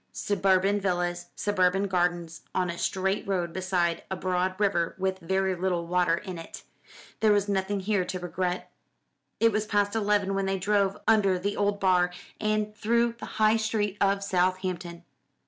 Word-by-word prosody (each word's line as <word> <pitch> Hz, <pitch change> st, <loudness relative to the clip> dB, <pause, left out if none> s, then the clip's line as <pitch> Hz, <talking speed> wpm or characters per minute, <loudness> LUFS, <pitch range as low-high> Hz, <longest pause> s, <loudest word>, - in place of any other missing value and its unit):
Suburban 195 Hz, 0 st, +2 dB
villas, 175 Hz, -2 st, -1 dB
suburban 195 Hz, -1 st, +1 dB
gardens 175 Hz, -3 st, -1 dB
on 180 Hz, -2 st, +1 dB
a 170 Hz, -, -7 dB
straight 195 Hz, +2 st, -1 dB
road 175 Hz, -4 st, -1 dB
beside 180 Hz, -3 st, 0 dB
a 190 Hz, -, -2 dB
broad 185 Hz, +1 st, -1 dB
river 190 Hz, -5 st, +1 dB
with 190 Hz, 0 st, -1 dB
very 190 Hz, +2 st, 0 dB
little 180 Hz, -1 st, -1 dB
water 175 Hz, -1 st, +2 dB
in 185 Hz, -3 st, -7 dB
it. 165 Hz, -, -10 dB, 0.6 s
There 215 Hz, -1 st, +4 dB
was 205 Hz, -1 st, +2 dB
nothing 195 Hz, 0 st, -1 dB
here 200 Hz, -1 st, +1 dB
to 185 Hz, -, -4 dB
regret. 180 Hz, 0 st, -3 dB, 0.7 s
It 230 Hz, 0 st, +4 dB
was 215 Hz, 0 st, -1 dB
past 205 Hz, -1 st, +1 dB
eleven 205 Hz, -3 st, +1 dB
when 195 Hz, 0 st, -1 dB
they 195 Hz, 0 st, 0 dB
drove 200 Hz, +1 st, +1 dB
under 200 Hz, -4 st, +4 dB
the 200 Hz, +3 st, -2 dB
old 205 Hz, 0 st, 0 dB
bar, 180 Hz, -2 st, +3 dB, 0.3 s
and 215 Hz, 0 st, -1 dB
through 235 Hz, +2 st, +1 dB
the -, -, -7 dB
high 215 Hz, +1 st, +4 dB
street 215 Hz, -2 st, -1 dB
of 200 Hz, 0 st, +2 dB
Southampton. 185 Hz, -2 st, -1 dB
190 Hz, 165 wpm, -27 LUFS, 180-205 Hz, 0.7 s, There